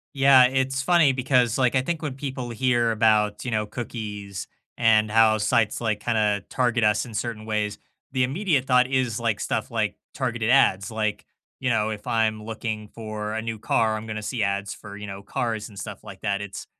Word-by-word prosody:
Yeah. 135 -2 +7
It's 135 +1 +1
funny 170 -3 +4
because, 125 -2 +2
like, 125 -2 +2
I 130 - +4
think 165 +4 -3
when 150 -4 -3
people 130 -3 -5
hear 120 0 +1
about, 105 -2 +2
you 125 - -2
know, 110 -2 0
cookies 105 -4 -6 0.3
and 110 -2 +4
how 110 0 +5
sites, 105 +1 +1
like, 110 -3 -1
kinda 105 -3 +1
target 120 -2 +1
us 105 +3 +2
in 115 - -10
certain 110 -1 -4
ways, 105 -1 -1 0.3
the 130 -1 +1
immediate 145 -1 0
thought 125 -1 +4
is, 130 -4 0
like, 115 -3 -1
stuff - - -2
like, - - -1 0.2
targeted 120 -4 -1
ads. 100 -7 +4
Like, 110 -1 -2 0.4
you 130 - 0
know, 110 -2 +2
if 105 -1 -7
I'm 110 -1 +1
looking 110 -1 -5
for 110 -1 -6
a 110 - -1
new 115 0 -4
car, 110 0 +1
I'm 110 +1 -7
gonna 110 -1 -5
see 115 +1 -2
ads 100 0 -1
for, 100 -1 -11
you 105 - -7
know, 100 0 -7
cars 110 +1 -3
and 100 - -12
stuff - - -7
like 100 -3 -10
that. 100 -1 -1
It's 100 -1 -7
110 Hz, 200 wpm, -24 LUFS, 105-125 Hz, 0.4 s, Yeah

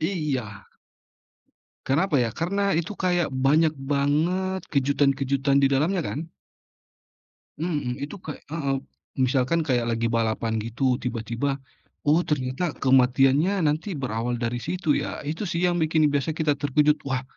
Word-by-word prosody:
Iya. 140 - -3 1.2
Kenapa 155 +4 +2
ya, 120 -3 +1
karena 200 +4 0
itu 170 +5 -2
kayak 175 -3 +1
banyak 145 +4 +2
banget 155 +8 0
kejutan-kejutan 140 0 +2
di 135 - +4
dalamnya 155 +8 +1
kan. 155 0 -4 1.3
Mhm, 145 -7 -2
itu 150 +8 -5
kayak 155 -4 -8
heeh. 140 -4 -1 0.4
Misalkan 130 +5 +1
kayak 125 -5 0
lagi 115 0 -1
balapan 110 -1 0
gitu, 125 +3 0
tiba-tiba, 120 +3 -2 0.5
oh, 155 +4 +4
ternyata 145 +3 -1
kematiannya 135 +8 +3
nanti 155 +5 0
berawal 120 -3 -2
dari 120 0 -2
situ 160 - -3
ya. - - -4
Itu 160 +8 -4
sih, 170 +1 -2
yang 175 - -1
bikin 155 -2 +3
biasa 145 +2 -1
kita 150 -3 0
terkejut, 150 +2 +2
"Wah, 130 -1 -1
140 Hz, 130 wpm, -25 LUFS, 130-160 Hz, 1.3 s, di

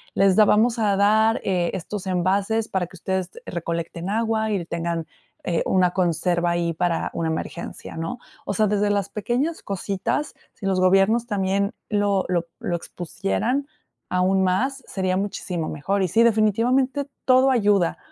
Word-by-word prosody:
les 195 -1 +4
da 215 - +7
vamos 230 +3 +3
a 205 -3 +2
dar, 220 +4 +3
eh, 180 -3 0
estos 190 +2 -5
envases, 195 +5 +1
para 185 -3 -1
que 185 - -15
ustedes 185 +1 -2
recolecten 170 +1 -4
agua, 220 0 0
y 190 -5 -1
tengan, 170 -1 -3 0.4
eh, 170 -2 0
una 180 -2 +3
conserva 175 -1 +1
ahí, 170 -1 0
para 170 0 -1
una 165 -1 -1
emergencia", 160 +2 -5
¿no? 165 +9 -4 0.3
O 200 - -2
sea, 215 - +3
desde 205 0 +1
las 200 -1 0
pequeñas 250 - -2
cositas, 200 +8 -2 0.2
si 200 - -9
los 190 -1 +1
gobiernos 195 +6 +3
también 200 -1 0
lo 205 -2 +1
lo 175 -2 0
lo 175 - -2
expusieran, 170 - -2 0.4
aún 185 +1 +2
más, 255 +9 0
sería 185 -1 -1
muchísimo 185 -4 -3
mejor. 190 +7 -1
Y 190 - +2
sí, 225 +7 +3
definitivamente, 235 +5 +2 0.2
todo 260 +1 +5
ayuda, 205 -7 +2
195 Hz, 155 wpm, -23 LUFS, 175-220 Hz, 0.4 s, da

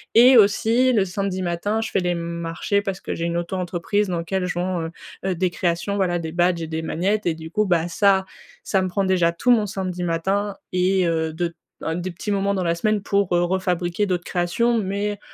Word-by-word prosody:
et 250 +2 +8
aussi 225 +5 +4
le 205 -4 +3
samedi 190 0 -2
matin, 185 +5 -1
je 225 - -4
fais - - +2
les 180 -1 0
marchés 170 +4 -2
parce 195 -2 -4
que - - -4
j'ai 165 - -3
une 170 0 -1
auto-entreprise 180 +3 -1
dans 175 -2 -2
lequel 180 +2 -2
je 180 - -2
vends, 175 -2 -2 0.4
heu, 185 -2 0
des 185 +2 +1
créations, 175 +3 -1
voilà 180 -3 +1
des 160 -1 -5
badges 175 0 +1
et 160 - -4
des 160 0 -3
magnettes 190 +6 -1
et 170 - +2
du 160 +1 -9
coup 210 +3 +1
bah 175 -3 +1
ça, 190 +1 +3 0.4
ça 195 - +1
me 185 - 0
prend 195 +2 -1
déjà 185 -3 +3
tout 245 +9 +2
mon 220 -3 +4
samedi 185 -3 -4
matin 195 +4 -1 0.2
et 185 +1 +2
heu, 160 -1 0
de 170 +1 -3 0.3
un 160 - -2
des 180 +1 -3
petits 185 +4 -5
moments 200 0 +1
dans 185 - -1
la 170 -1 +1
semaine 210 +4 0
pour, 200 -3 +1
heu, 175 - +3
re-fabriquer 180 +1 0
d'autres 180 -1 -1
créations. 220 +8 +1
Mais 205 +1 -2
185 Hz, 220 wpm, -22 LUFS, 170-200 Hz, 0.4 s, et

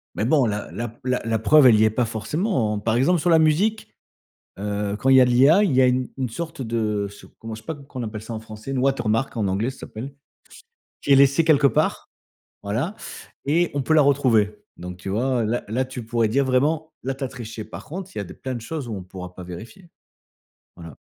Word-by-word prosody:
Mais - - -1
bon, 135 +1 +3
la 105 -2 -3
la 120 +2 -4
p 115 +2 -14
la 125 -1 0
la 115 -1 0
preuve, 140 +5 +6
elle 110 -3 +6
y 110 - +5
est 110 - +5
pas 120 +3 0
forcément. 110 - -1
Par 110 +2 0
exemple, 160 +9 +3
sur 175 - 0
la 165 -1 +6
musique, 185 +8 +1 0.6
heu, 100 0 -2
quand 135 - 0
il 130 - +7
y 130 - +8
a - - +6
de - - 0
l'IA, 140 +11 +6
il 180 -10 +1
y 130 - +5
a 130 - +5
une 125 0 +1
une 130 -2 -2
sorte 160 +3 -6
de 110 -3 -1
se 100 - -14
comment 115 0 -7
je 110 - -11
sais - - -29
pas 160 - -4
comment 140 -1 -15 0.2
on - - -3
appelle 105 0 -7
ça 115 +1 -7
en 110 - -4
français? 110 +3 -9
Une 135 - -2
watermark 130 -2 0
en 105 -3 0
anglais, 105 +6 0
ça 130 - -11
s'appelle, 130 +6 -8 0.9
qui 140 - -1
est - - +9
laissée 140 +3 +5
quelque 150 -3 +5
part, - - 0 0.5
voilà 120 - -2 0.5
et 170 +4 +2
on 140 - 0
peut 155 - +1
la 155 - +6
retrouver. 115 -7 +2 0.2
Donc 90 0 -8
tu 95 - -8
vois, 120 +4 0
là 115 +3 -1
là, 125 +5 0
tu 125 -2 -7
pourrais 115 0 +1
dire 135 +6 +2
vraiment: 150 +5 0
«Là, 135 +2 -2
tu 135 0 -5
as - - -2
triché». 115 -4 -8
Par 110 - -10
contre, 185 +4 -7
il - - -5
y - - -1
a 100 - -4
des 90 - -11
plein 130 -1 -5
de 120 - -5
choses 145 +2 -5
où 110 - -4
on 95 - -6
pourra 90 0 -9
pas 90 - -9
vérifier. 115 - -10 0.9
Voilà. 85 -4 -11
125 Hz, 250 wpm, -23 LUFS, 110-140 Hz, 0.9 s, est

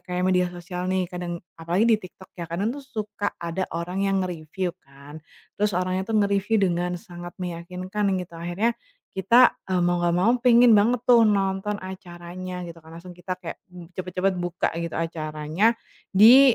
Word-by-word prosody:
kayak 180 0 -2
media 180 -1 +3
sosial 180 +1 -6
nih, 185 -1 +1
kadang 175 -1 -5 0.2
apalagi 170 +6 +1
di 225 - +6
TikTok 185 0 -13
ya, 175 - -4
kadang 190 +6 -1
tuh 285 -1 -9
suka 210 -5 -4
ada 170 +2 -2
orang 180 +4 -2
yang 195 0 +1
nge-review 175 +1 -3
kan, 140 +3 -13 0.4
terus 210 0 +1
orangnya 185 +1 0
tuh - - +3
nge-review 200 +2 +1
dengan 175 +1 -1
sangat 175 -4 -9
meyakinkan 180 +4 -3
gitu. 175 -1 -9
Akhirnya 175 +8 -1 0.4
kita, 235 +7 +5
eee, 185 -1 +1
mau 175 0 +1
nggak 170 0 +2
mau 225 +5 +4
pengen 240 -1 +7
banget 230 +4 +3
tuh 235 -2 +7
nonton 195 0 0
acaranya 180 -1 -7
gitu 170 - -10
kan, 160 - -15
langsung 175 +2 -10
kita 180 +1 -4
kayak 170 - -6 0.4
cepat-cepat 185 +1 -1
buka 175 0 -1
gitu 170 -1 -3
acaranya 160 +5 0 0.4
di 240 +6 +8
185 Hz, 165 wpm, -25 LUFS, 175-205 Hz, 0.4 s, di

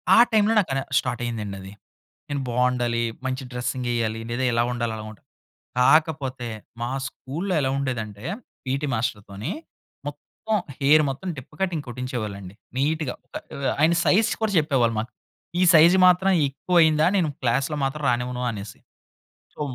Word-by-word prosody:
ఆ - - +6
టైమ్‌లో 215 0 +4
నాకనె 135 -8 0 0.2
స్టార్ట్ 120 -1 -3
అయిందండి 105 -4 -4
అది. 95 +1 -9 0.6
నేను 140 -1 -2
బావుండాలి, 125 -1 +1 0.3
మంచి 130 +1 -2
డ్రెసింగెయ్యాలి. 120 -2 -2
లేదా 125 +2 -1
ఇలా 115 0 +3
ఉండాలి, 120 -2 -2
అలా 110 - -7
ఉండాలి. 110 - -16 0.5
కాకపోతే, 135 -3 +2 0.3
మా 120 - -2 0.2
స్కూల్‌లో 170 +10 -4
ఎలా 130 -2 +1
ఉండేదంటే, 115 -6 -4 0.4
పీటీ 135 +3 -1
మాస్టర్ 110 -2 -1
తోని 105 - -5 0.5
మొత్తం, 220 -1 -4 0.2
హెయిర్ 150 +3 +6
మొత్తం 155 +8 -5
డిప్ప 130 - -10
కటింగ్ 170 -6 -1
కొట్టించేవాళ్ళండి. 110 -7 -5 0.2
నీట్‌గా 150 -1 0 0.2
ప - - -4 0.2
ఆహ్, 140 -1 0
ఆయన 160 +3 +5
సైజ్ 215 +4 +4
కూడా 215 - +1
చెప్పేవాళ్ళు 135 -7 +2
మాకు. 115 +3 -7 0.5
ఈ - - +4
సైజ్ 165 +3 +8
మాత్రం 180 +2 +4 0.2
ఎక్కువ 175 +6 -2
అయిందా, 155 0 +4
నేను 175 -5 +2
క్లాస్‌లో 135 +5 +1
మాత్రం 140 +2 -2
రానివ్వను 125 +1 -2
అనేసి. 100 -1 -8 0.8
సో, - - -14
130 Hz, 145 wpm, -24 LUFS, 120-155 Hz, 0.8 s, సైజ్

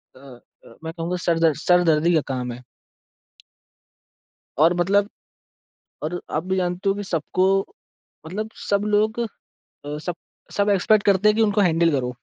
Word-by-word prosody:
अ - - -16
अ, 125 -3 -17
मैं 160 0 -5
कहूँगा 170 +2 -3
सर 165 -1 +2
दर्द 160 -3 +3
सरदर्दी 170 -2 +4
का 155 - +3
काम 125 -1 -3
है। 125 +1 -10 2.0
और 165 +3 +5
मतलब 200 +3 +2 0.9
और 175 +3 -3
आप 155 +3 -1
भी 190 0 -1
जानते 180 +2 -1
हो 195 - +3
कि 205 - -5
सबको 185 +1 -1 0.8
मतलब 215 +6 -4 0.2
सब 200 0 +2
लोग 220 +3 +1 0.5
अ, 145 +1 -9
सब 175 +2 -4 0.4
सब 205 0 +2
एक्सपेक्ट 205 +2 +3
करते 200 +1 +4
हैं 210 - +3
कि 225 - +3
उनको 205 -1 +2
हैंडल 165 0 +2
करो। 130 -3 0
175 Hz, 155 wpm, -22 LUFS, 155-200 Hz, 2.0 s, और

